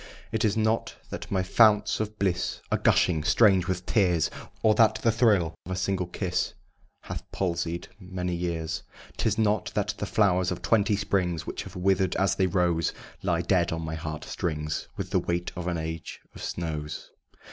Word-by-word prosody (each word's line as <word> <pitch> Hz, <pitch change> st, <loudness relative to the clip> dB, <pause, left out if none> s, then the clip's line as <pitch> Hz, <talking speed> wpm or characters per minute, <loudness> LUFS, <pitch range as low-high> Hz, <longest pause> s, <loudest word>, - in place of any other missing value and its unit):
It 110 Hz, 0 st, 0 dB
is 110 Hz, 0 st, +2 dB
not 110 Hz, +1 st, +1 dB, 0.2 s
that -, -, -6 dB
my 95 Hz, -2 st, +1 dB
founts 105 Hz, +1 st, +4 dB
of 110 Hz, 0 st, -3 dB
bliss 95 Hz, -4 st, 0 dB
Are -, -, +3 dB
gushing 80 Hz, -4 st, +3 dB
strange! 95 Hz, -1 st, +4 dB
with 90 Hz, -1 st, -2 dB
tears 90 Hz, -7 st, +2 dB, 0.3 s
Or 110 Hz, -, +6 dB
that 110 Hz, 0 st, +5 dB
the 115 Hz, +1 st, +2 dB
thrill 105 Hz, -8 st, +3 dB
of 90 Hz, -, -8 dB
a -, -, -1 dB
single 95 Hz, -1 st, -1 dB
kiss 90 Hz, 0 st, -2 dB, 0.5 s
Hath -, -, -6 dB
palsied 85 Hz, -2 st, -2 dB
many 90 Hz, -2 st, -4 dB
years 85 Hz, -2 st, -2 dB, 0.4 s
'Tis 110 Hz, -2 st, +1 dB
not 110 Hz, -1 st, +1 dB
that 105 Hz, 0 st, 0 dB
the 100 Hz, -, -2 dB
flowers 95 Hz, -3 st, +3 dB
of 90 Hz, -1 st, -4 dB
twenty 105 Hz, -1 st, +3 dB
springs 90 Hz, -5 st, 0 dB
Which -, -, -4 dB
have -, -, -10 dB
wither'd 95 Hz, 0 st, +2 dB
as 95 Hz, 0 st, +2 dB
they 95 Hz, -, +2 dB
rose 85 Hz, -3 st, +1 dB, 0.3 s
Lie 85 Hz, -3 st, +1 dB
dead 85 Hz, 0 st, +2 dB
on 80 Hz, 0 st, -3 dB
my 80 Hz, 0 st, -4 dB
heart 80 Hz, -1 st, -5 dB
strings 75 Hz, -4 st, -3 dB
With -, -, -4 dB
the -, -, +3 dB
weight 85 Hz, 0 st, -2 dB
of 90 Hz, 0 st, -4 dB
an 85 Hz, -1 st, 0 dB
age 80 Hz, 0 st, -5 dB
of -, -, -10 dB
snows. 75 Hz, -3 st, -4 dB
90 Hz, 180 wpm, -27 LUFS, 85-105 Hz, 0.5 s, Or